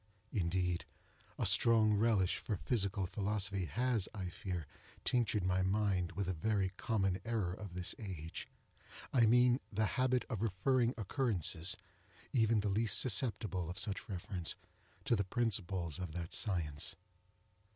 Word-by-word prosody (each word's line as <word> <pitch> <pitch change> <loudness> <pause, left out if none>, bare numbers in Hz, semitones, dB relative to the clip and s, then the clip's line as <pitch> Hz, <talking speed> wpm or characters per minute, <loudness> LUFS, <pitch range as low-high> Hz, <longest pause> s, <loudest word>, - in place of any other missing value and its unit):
Indeed, 90 -2 0 0.5
a - - 0
strong 110 -2 +5
relish 100 -3 +3
for 105 - -2
physical 100 -3 +1
philosophy 100 -1 -1
has, 115 - +1
I 95 -3 -3
fear, 90 -2 -4 0.4
tinctured 115 -5 +2
my 90 0 +2
mind 95 -2 +1
with 100 0 -2
a 95 - 0
very 95 +3 +1
common 95 -1 0
error 110 -6 -1
of 95 -2 -8
this 90 -1 -1
age—I 95 - -3
mean 125 +2 +5
the 110 +1 +1 0.2
habit 130 -1 +2
of 110 -6 -3
referring 115 +4 +2
occurrences, 100 - 0 0.6
even 115 -3 +3
the 105 - -1
least 105 +1 +2
susceptible 105 - 0
of 90 - -6
such 105 0 -2
reference, 90 -2 -3 0.5
to 120 - +3
the 100 - +1
principles 95 - -1
of 90 -4 -4
that 85 0 -5
science. 85 -6 -1
100 Hz, 135 wpm, -36 LUFS, 90-115 Hz, 0.6 s, strong